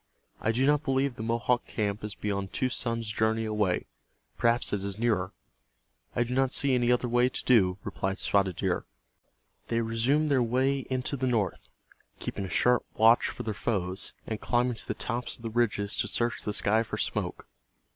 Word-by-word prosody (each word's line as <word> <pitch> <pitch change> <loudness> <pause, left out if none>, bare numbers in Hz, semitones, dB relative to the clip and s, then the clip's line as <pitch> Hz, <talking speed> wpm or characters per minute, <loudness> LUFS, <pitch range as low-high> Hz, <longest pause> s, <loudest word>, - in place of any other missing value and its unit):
I 110 - +1
do 125 +4 +1
not 145 0 +4
believe 135 -1 +1
the 115 - -8
Mohawk 115 +2 0
camp 105 -1 -2
is 105 -1 -4
beyond 100 -2 -3
two 130 - 0
suns' 115 -2 -2
journey 110 +1 +1
away. 105 -4 0 0.5
Perhaps 120 -1 +2
it 100 -1 -1
is 100 0 -3
nearer." 105 -5 +1 0.8
"I 120 - +3
do 120 +1 -4
not 135 0 +2
see 140 -2 +3
any 120 -1 +3
other 125 0 +2
way 120 +1 +3
to - - -5
do," 95 -7 +4
replied 95 0 -2
Spotted 100 -3 +1
Deer. - - -1 0.8
They 115 0 +1
resumed 125 +7 +1
their 135 -3 +3
way 130 +3 +1
into 130 +2 -1
the 130 -1 -1
north, 110 -6 -1 0.5
keeping 100 - -4
a - - -6
sharp 125 +4 +3
watch 115 +2 +5
for - - -5
their 110 - -2
foes, 95 -2 -2
and 110 -1 -4
climbing 125 0 +1
to - - -11
the - - -2
tops 120 +1 -3
of 115 - -15
the 115 - -4
ridges 105 -3 0
to - - +1
search 120 0 -1
the 105 - -3
sky 105 +2 +2
for 115 - -4
smoke. - - -2
115 Hz, 190 wpm, -28 LUFS, 105-125 Hz, 0.8 s, watch